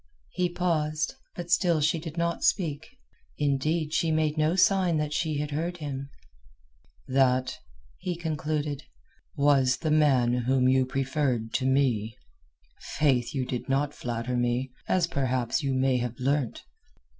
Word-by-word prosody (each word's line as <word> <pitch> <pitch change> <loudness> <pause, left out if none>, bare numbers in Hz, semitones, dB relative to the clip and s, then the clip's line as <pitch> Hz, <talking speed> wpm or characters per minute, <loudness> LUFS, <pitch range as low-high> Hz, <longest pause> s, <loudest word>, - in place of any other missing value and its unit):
He 180 -1 0
paused, 160 -3 -1 0.2
but 175 -1 -6
still 175 -3 +3
she 155 +2 +1
did 160 0 -8
not 170 0 -1
speak; 160 - 0 0.4
indeed, 150 +2 0
she 165 - +1
made 155 -1 +1
no 155 +2 +2
sign 190 -3 +3
that 150 -1 -2
she 155 -1 -1
had 150 0 -3
heard 170 +4 -2
him. 140 -3 -5 1.0
"That," 130 -1 +2 0.4
he 180 -1 -3
concluded, 150 -3 -2 0.5
"was 140 -3 +3
the 155 - -2
man 135 -6 +4
whom 125 +1 +2
you 130 0 +3
preferred 130 -4 -1
to 130 - 0
me. 120 -5 +1 0.8
Faith, 135 -4 +2
you 130 -2 0
did 125 +1 -4
not 140 +2 +1
flatter 120 +1 -3
me, 120 +1 0 0.2
as 185 -2 +2
perhaps 130 -3 -1
you 135 -2 -1
may 130 0 +2
have 120 -1 -3
learnt." 135 -1 -1
145 Hz, 145 wpm, -27 LUFS, 130-160 Hz, 1.0 s, man